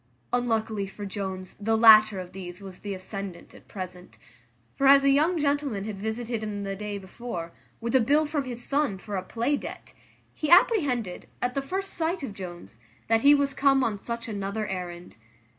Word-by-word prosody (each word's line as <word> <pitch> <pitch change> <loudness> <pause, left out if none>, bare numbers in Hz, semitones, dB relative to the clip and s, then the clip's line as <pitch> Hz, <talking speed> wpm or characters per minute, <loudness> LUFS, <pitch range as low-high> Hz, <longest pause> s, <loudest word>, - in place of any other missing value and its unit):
Unluckily 225 -4 0
for 205 +2 -8
Jones, 190 -2 -5
the 225 +2 +1
latter 215 -3 +8
of 180 -1 -8
these 180 -1 -8
was 195 -2 -10
the 200 -1 -5
ascendant 190 -1 -7
at - - -16
present; 185 -2 -8 0.6
for 275 - +2
as 275 0 +8
a 275 - +5
young 310 +6 +3
gentleman 285 -8 0
had 205 -2 -5
visited 225 +2 -3
him 210 -2 -4
the 195 0 -3
day 205 0 -4
before, 190 -3 -6 0.3
with 235 0 -3
a 260 - +6
bill 290 +6 +3
from 295 -2 -2
his 245 -1 -6
son 280 -8 0
for 205 +1 -6
a 185 - -1
play 235 +9 -1
debt, - - -8 0.4
he 305 - -3
apprehended, 290 - +3
at 250 0 -1
the 275 - -1
first 385 +8 -4
sight 335 0 -1
of 225 - -4
Jones, 175 - -9 0.3
that 225 0 +4
he 285 +3 +7
was 280 -1 +1
come 270 -1 +3
on 215 -4 -1
such 235 +2 -5
another 205 0 -3
errand. 180 - -6
220 Hz, 190 wpm, -27 LUFS, 195-275 Hz, 0.6 s, latter